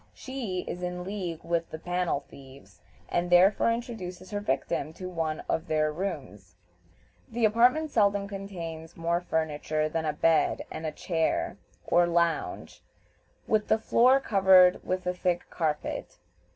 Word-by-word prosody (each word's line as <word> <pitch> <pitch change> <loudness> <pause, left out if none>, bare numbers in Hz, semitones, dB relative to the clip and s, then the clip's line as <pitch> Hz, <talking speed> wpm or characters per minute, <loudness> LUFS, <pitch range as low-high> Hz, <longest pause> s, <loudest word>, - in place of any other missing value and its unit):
She 235 -9 -4
is 180 - -6
in 180 0 -4
league 180 -4 -5
with 170 -1 -1
the 160 - -6
"panel 175 -3 -1
thieves," 130 -10 -15 0.3
and 175 0 -1
therefore 190 +5 +5
introduces 205 -6 -5
her 205 - -2
victim 155 -3 -2
to 185 +2 -7
one 160 -3 -2
of 165 +2 -2
their 155 -1 +1
rooms. 140 - -6 0.7
The 230 0 +1
apartment 250 +8 +3
seldom 200 -3 +2
contains 175 -5 -7
more 170 +1 0
furniture 155 -2 -1
than 160 0 -2
a 150 - 0
bed 165 0 +2
and 160 - -4
a - - -2
chair 160 +1 -1 0.3
or 175 0 +4
lounge, 170 -1 -1 0.6
with 215 -1 +1
the 220 - +4
floor 250 +4 +4
covered 190 -6 +5
with 185 0 -2
a 180 - 0
thick 180 -1 -2
carpet. 155 -3 -3
180 Hz, 145 wpm, -28 LUFS, 160-200 Hz, 0.7 s, therefore